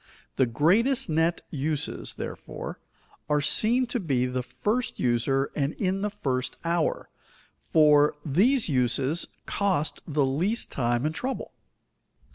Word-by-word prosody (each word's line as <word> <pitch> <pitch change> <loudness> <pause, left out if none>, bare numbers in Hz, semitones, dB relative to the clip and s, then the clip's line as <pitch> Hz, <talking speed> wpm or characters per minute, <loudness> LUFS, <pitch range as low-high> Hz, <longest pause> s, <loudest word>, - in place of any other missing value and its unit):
The 130 - +3
greatest 215 - +2
net 165 +2 +1
uses, 150 0 -3
therefore, - - -7 0.5
are 150 0 +3
seen 230 - +3
to 245 0 -2
be 135 - 0
to 125 - -3
the 125 0 -1
first 225 - -2
user 130 +3 +1
and 140 0 0
in 195 -1 -1
the 210 - 0
first 130 -11 -3
hour, 165 -1 -1 0.5
for 150 -2 +4
these 215 - +3
uses 135 +3 +1 0.2
cost 190 -7 0
the 150 -3 +1
least 175 - -1
time 120 0 0
and 155 - 0
trouble. 260 +10 -4
155 Hz, 130 wpm, -26 LUFS, 135-200 Hz, 0.5 s, for